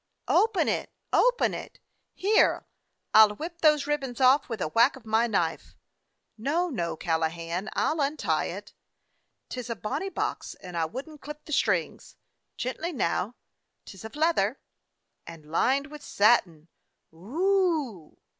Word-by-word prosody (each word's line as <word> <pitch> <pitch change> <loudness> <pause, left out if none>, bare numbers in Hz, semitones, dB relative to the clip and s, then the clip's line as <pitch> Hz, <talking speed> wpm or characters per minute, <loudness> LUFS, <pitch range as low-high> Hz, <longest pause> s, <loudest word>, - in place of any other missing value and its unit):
"Open 435 -3 +3
it; - - -1 0.2
open - - +3
it! - - -8 0.4
Here, 415 +3 +3 0.5
I 220 - +9
'll 210 -1 +5
whip 335 +6 -7
those 300 -3 +4
ribbons 275 -5 -2
off 260 +2 +4
with 225 -3 -4
a 180 - -1
whack 230 - +4
of 260 -4 -14
my 220 +2 +2
knife." 170 -7 -2 0.6
"No, 325 +10 0
no, 175 - -2
Callahan, 165 +4 -2
I - - +1
'll 310 -1 -1
untie 285 +2 0
it. - - -7 0.8
'T 255 - -5
is 245 - -7
a 230 - -2
bonny 215 - -3
box, 380 - -3
and 180 -2 -10
I 165 -1 +1
would 255 - -6
n't 305 -2 -13
clip 300 +1 -9
the 305 - -6
strings. - - 0 0.4
Gently 310 +8 -3
now; 215 - -1 0.5
't - - -10
is 190 - -12
of 220 +3 -9
leather!" 300 -7 +1 0.7
"And 165 -2 -11
lined 270 +11 +2
with 300 -1 -9
satin. 190 - +2 0.4
Whoo!" 295 - -1
250 Hz, 155 wpm, -27 LUFS, 195-305 Hz, 0.8 s, I